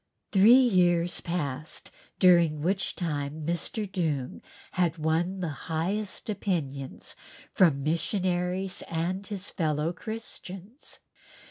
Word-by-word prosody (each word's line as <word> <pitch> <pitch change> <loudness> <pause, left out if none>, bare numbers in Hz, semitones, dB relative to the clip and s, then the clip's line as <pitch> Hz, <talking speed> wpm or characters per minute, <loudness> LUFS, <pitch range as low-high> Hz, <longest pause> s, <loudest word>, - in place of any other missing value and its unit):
Three 215 +6 +8
years 175 -6 +3
passed 155 -4 -4 0.3
during 170 -5 +5
which 190 +3 0
time 150 -2 -3
Mr. 175 +6 -2
Doong 155 -9 -2 0.3
had 175 -2 +1
won 165 +4 0
the 175 - -1 0.2
highest 190 +8 -2
opinions 155 -10 -3 0.4
from 150 -7 +4
missionaries 180 +3 0
and 180 +4 -2
his 200 -2 -4
fellow 155 -2 0
Christians. 220 - -7
175 Hz, 100 wpm, -28 LUFS, 160-190 Hz, 0.4 s, Three